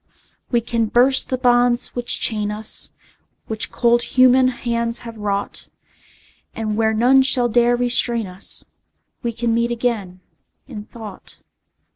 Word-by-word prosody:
We 240 Hz, -2 st, +1 dB
can 230 Hz, -1 st, -1 dB
burst 250 Hz, +4 st, +2 dB
the 255 Hz, -, -1 dB
bonds 245 Hz, -1 st, +2 dB
which 245 Hz, -1 st, -1 dB
chain 210 Hz, -2 st, 0 dB
us, 215 Hz, +1 st, -2 dB, 0.5 s
Which 220 Hz, -1 st, -3 dB
cold 240 Hz, 0 st, +2 dB
human 255 Hz, +1 st, +4 dB
hands 235 Hz, -2 st, -2 dB
have 230 Hz, -1 st, -8 dB
wrought, 205 Hz, -2 st, -4 dB, 0.9 s
And 215 Hz, -1 st, -3 dB
where 220 Hz, 0 st, +1 dB
none 255 Hz, +4 st, +4 dB
shall 260 Hz, -2 st, +2 dB
dare 240 Hz, +1 st, +3 dB
restrain 240 Hz, -2 st, +1 dB
us 185 Hz, +1 st, -2 dB, 0.6 s
We 235 Hz, -, -2 dB
can 230 Hz, 0 st, -2 dB
meet 235 Hz, +1 st, +1 dB
again, 220 Hz, -7 st, -3 dB, 0.5 s
in 215 Hz, -6 st, -8 dB
thought. 215 Hz, -5 st, -11 dB
235 Hz, 135 wpm, -20 LUFS, 220-245 Hz, 0.9 s, human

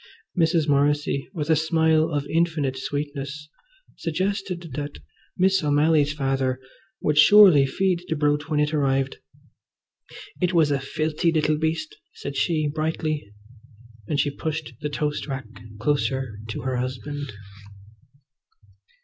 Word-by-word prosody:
Mrs. 165 Hz, -2 st, +2 dB
Morrissy, 145 Hz, -1 st, +1 dB
with 160 Hz, -4 st, -2 dB
a -, -, +6 dB
smile 160 Hz, 0 st, +2 dB
of 145 Hz, -3 st, -2 dB
infinite 160 Hz, -4 st, 0 dB
sweetness, 145 Hz, +1 st, -5 dB, 0.5 s
suggested 180 Hz, -1 st, -3 dB
that 145 Hz, +1 st, -5 dB, 0.4 s
Miss 190 Hz, -1 st, +3 dB
O'Malley's 150 Hz, 0 st, +3 dB
father 135 Hz, -3 st, -1 dB, 0.4 s
would 150 Hz, 0 st, +2 dB
surely 180 Hz, -6 st, +8 dB
feed 180 Hz, +3 st, 0 dB
the 160 Hz, -, -1 dB
brute 145 Hz, 0 st, 0 dB
when 150 Hz, -2 st, +1 dB
it 150 Hz, +1 st, +1 dB
arrived. 135 Hz, -2 st, +1 dB, 1.2 s
"It 180 Hz, 0 st, +1 dB
was 155 Hz, -3 st, +4 dB
a 140 Hz, -, +1 dB
filthy 155 Hz, +4 st, -1 dB
little 155 Hz, -1 st, +1 dB
beast," 160 Hz, 0 st, -2 dB, 0.2 s
said 140 Hz, -, -6 dB
she 155 Hz, -1 st, +1 dB
brightly; 155 Hz, -5 st, -2 dB, 0.8 s
and 145 Hz, -, -1 dB
she 145 Hz, 0 st, +1 dB
pushed 155 Hz, +1 st, -4 dB
the 150 Hz, -, -2 dB
toast 150 Hz, 0 st, -2 dB
rack 135 Hz, -3 st, -4 dB, 0.3 s
closer 130 Hz, -3 st, -1 dB
to 110 Hz, -, -5 dB
her 130 Hz, +1 st, -2 dB
husband. 130 Hz, +3 st, -4 dB
150 Hz, 125 wpm, -24 LUFS, 140-160 Hz, 1.2 s, surely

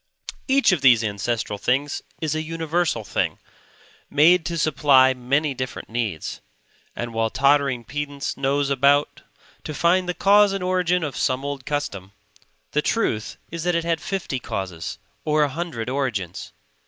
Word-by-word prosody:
Each 270 Hz, -4 st, +4 dB
of 175 Hz, -6 st, +1 dB
these 120 Hz, -4 st, +6 dB
ancestral 105 Hz, 0 st, -2 dB
things 135 Hz, +6 st, 0 dB, 0.2 s
is 155 Hz, -2 st, -1 dB
a 155 Hz, -, -1 dB
universal 165 Hz, -5 st, -1 dB
thing; -, -, -1 dB, 0.7 s
made 160 Hz, +3 st, +4 dB
to 170 Hz, -1 st, -3 dB
supply 140 Hz, -4 st, +4 dB
many 140 Hz, +4 st, 0 dB
different 130 Hz, -1 st, -6 dB
needs; 110 Hz, -9 st, -3 dB, 0.5 s
and 120 Hz, -1 st, -5 dB
while 115 Hz, 0 st, 0 dB
tottering 140 Hz, -1 st, +2 dB
pedants 145 Hz, +3 st, -4 dB
nose 140 Hz, +1 st, 0 dB
about 145 Hz, +2 st, +2 dB, 0.4 s
to 155 Hz, -, -6 dB
find 180 Hz, +4 st, +2 dB
the 180 Hz, -, -1 dB
cause 205 Hz, 0 st, +5 dB
and 195 Hz, -2 st, -3 dB
origin 180 Hz, -1 st, +1 dB
of 145 Hz, -4 st, -4 dB
some 130 Hz, +2 st, 0 dB
old 140 Hz, -2 st, -5 dB
custom, 100 Hz, -10 st, -3 dB, 0.6 s
the 150 Hz, -, +1 dB
truth 120 Hz, -, -1 dB
is 170 Hz, -1 st, -4 dB
that 175 Hz, 0 st, +1 dB
it 170 Hz, -, 0 dB
had 165 Hz, -1 st, -1 dB
fifty 185 Hz, -9 st, -3 dB
causes 95 Hz, -7 st, -5 dB, 0.3 s
or 150 Hz, 0 st, +2 dB
a 145 Hz, -, +1 dB
hundred 150 Hz, -6 st, -4 dB
origins. 120 Hz, -10 st, -3 dB
145 Hz, 155 wpm, -23 LUFS, 125-165 Hz, 0.7 s, these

